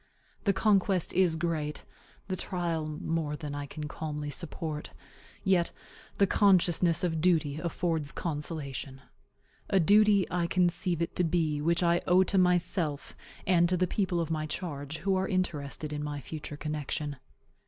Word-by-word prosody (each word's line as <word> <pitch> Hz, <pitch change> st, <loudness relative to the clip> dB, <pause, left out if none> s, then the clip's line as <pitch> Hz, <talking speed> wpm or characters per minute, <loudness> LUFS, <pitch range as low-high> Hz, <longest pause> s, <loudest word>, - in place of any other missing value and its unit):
The 200 Hz, -, +5 dB
conquest 195 Hz, -2 st, +2 dB
is 180 Hz, -3 st, +3 dB
great, 155 Hz, -2 st, -2 dB, 0.4 s
the 185 Hz, -, -1 dB
trial 170 Hz, -4 st, -2 dB
more 155 Hz, -1 st, -2 dB
than 150 Hz, -1 st, -6 dB
I 145 Hz, 0 st, -4 dB
can 150 Hz, +1 st, -6 dB
calmly 150 Hz, -1 st, -4 dB
support; 155 Hz, -2 st, -4 dB, 0.5 s
yet 185 Hz, -3 st, +3 dB, 0.5 s
the 200 Hz, -, +5 dB
consciousness 180 Hz, -4 st, +3 dB
of 160 Hz, -3 st, 0 dB
duty 160 Hz, -4 st, +2 dB
affords 165 Hz, -3 st, -1 dB
consolation 145 Hz, -4 st, -4 dB, 0.7 s
a 195 Hz, -, +4 dB
duty 205 Hz, +2 st, +5 dB
I 175 Hz, -1 st, +1 dB
conceive 175 Hz, -1 st, +1 dB
it 170 Hz, -, -5 dB
to 180 Hz, -, +3 dB
be 160 Hz, -3 st, +1 dB
which 170 Hz, +3 st, +2 dB
I 170 Hz, 0 st, +3 dB
owe 185 Hz, +1 st, +6 dB
to 190 Hz, +1 st, +1 dB
myself 175 Hz, -4 st, +1 dB, 0.3 s
and 175 Hz, -2 st, +4 dB
to 180 Hz, -, +2 dB
the 185 Hz, -, +3 dB
people 180 Hz, -1 st, 0 dB
of 165 Hz, -1 st, -2 dB
my 155 Hz, -1 st, -1 dB
charge, 150 Hz, -3 st, -5 dB
who 195 Hz, +3 st, 0 dB
are 190 Hz, -, 0 dB
interested 155 Hz, -5 st, -2 dB
in 150 Hz, 0 st, -3 dB
my 145 Hz, -1 st, -4 dB
future 150 Hz, +2 st, -6 dB
connection. 150 Hz, -1 st, -3 dB
165 Hz, 155 wpm, -29 LUFS, 150-180 Hz, 0.7 s, owe